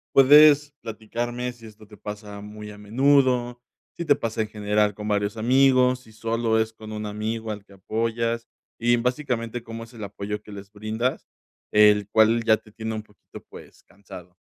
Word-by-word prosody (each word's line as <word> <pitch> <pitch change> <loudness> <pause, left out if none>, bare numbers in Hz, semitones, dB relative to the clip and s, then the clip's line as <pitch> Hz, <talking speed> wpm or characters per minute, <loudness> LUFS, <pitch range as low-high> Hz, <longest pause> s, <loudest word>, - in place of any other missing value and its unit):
Puedes 145 +1 +7
platicarme 120 +3 -4
si 115 -2 -16
esto 110 0 -14
te 105 -1 -15
pasa 105 0 -8
muy 105 0 -9
a 105 - -12
menudo, 125 +2 +2 0.3
si 170 - -5
te 145 - +5
pasa 115 -1 -3
en 110 - -2
general 105 -1 0
con 105 0 -6
varios 105 +1 -1
amigos, 130 +1 +4
si 110 - -18
solo 115 0 0
es 110 0 -1
con 110 -1 -11
un 105 0 -5
amigo 110 +1 -4
al 105 -1 -7
que 100 - -19
apoyas 115 +3 -2 0.3
y 120 +1 +3
básicamente, 120 -2 -2
¿cómo 115 0 -7
es 115 +2 -15
el 110 -2 -9
apoyo 100 +1 -5
que 105 - -14
les 100 0 -10
brindas, 110 +4 -3 0.4
el 105 -1 +5
cual 110 +1 +4
ya 110 -1 +4
te 105 - -20
tiene 110 0 -5
un 110 - -5
poquito, 105 -2 -15
pues - - -14
cansado? 95 -3 -13
110 Hz, 180 wpm, -24 LUFS, 105-120 Hz, 0.4 s, Puedes